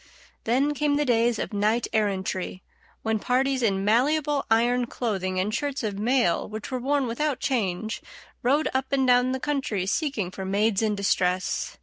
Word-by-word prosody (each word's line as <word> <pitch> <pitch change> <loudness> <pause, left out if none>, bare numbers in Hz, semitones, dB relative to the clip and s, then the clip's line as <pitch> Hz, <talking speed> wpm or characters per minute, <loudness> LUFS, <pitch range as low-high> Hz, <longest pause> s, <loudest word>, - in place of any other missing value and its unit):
Then 270 +6 +2
came 295 0 +1
the 295 0 +1
days 235 -2 +2
of - - -4
knight 215 +3 +1
errantry, 190 -3 -1 0.4
when 220 -1 0
parties 260 +3 +1
in 195 -4 +1
malleable 280 +6 +2
iron 240 +2 +2
clothing 190 -7 -2
and 205 +3 -1
shirts 285 0 -2
of 205 -2 -3
mail 235 -5 +1
which 215 +4 -7
were 255 - -1
worn 275 +2 +1
without 265 +4 -1
change 220 -4 -1 0.4
rode 280 +6 +2
up 265 0 -1
and 270 -1 +2
down 250 0 +4
the 260 - -2
country 265 -10 -1
seeking 215 - -1
for 190 - -6
maids 200 +2 +1
in 215 -2 +1
distress. 185 -2 0
235 Hz, 165 wpm, -25 LUFS, 205-265 Hz, 0.4 s, down